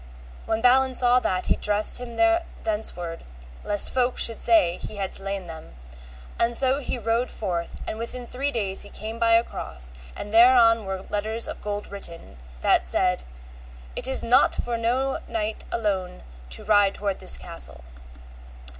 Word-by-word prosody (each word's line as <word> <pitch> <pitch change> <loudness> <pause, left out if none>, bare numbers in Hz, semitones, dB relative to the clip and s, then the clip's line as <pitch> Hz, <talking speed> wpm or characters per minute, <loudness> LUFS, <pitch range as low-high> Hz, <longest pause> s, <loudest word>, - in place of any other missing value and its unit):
When 220 0 -1
Balin 260 +1 +4
saw 245 0 +6
that, 185 -6 -1
he - - +2
dressed 210 +2 +2
him 240 -2 -8
thenceward, 220 - -1 0.4
lest 205 -1 +1
folk 250 -1 +1
would 230 - -7
say 180 -7 +3
he - - -7
had 195 -2 -4
slain 195 -1 -4
them; 160 - -11 0.6
and 235 0 +2
so 265 +1 +3
he 265 - -4
rode 230 +2 -1
forth, 175 -5 -4
and 220 - -4
within 240 +2 -5
three 265 +4 -2
days 195 -6 -2
he - - -5
came 220 +2 -7
by 230 0 +3
a 230 0 +5
cross, 65 - -6 0.2
and 205 +1 -8
thereon 230 -2 +6
were 190 0 -5
letters 215 +3 -2
of - - -7
gold 205 0 -4
written, 170 - -5 0.2
that 65 - +2
said, 180 - 0 0.7
It - - -1
is 265 - +2
not 240 +2 +4
for 240 - -2
no 250 +4 -1
knight 220 -1 -3
alone 195 - -2 0.3
to - - -4
ride 205 -2 +3
toward 200 -2 -3
this 185 - +4
castle. 165 - -6
220 Hz, 165 wpm, -24 LUFS, 195-240 Hz, 0.7 s, saw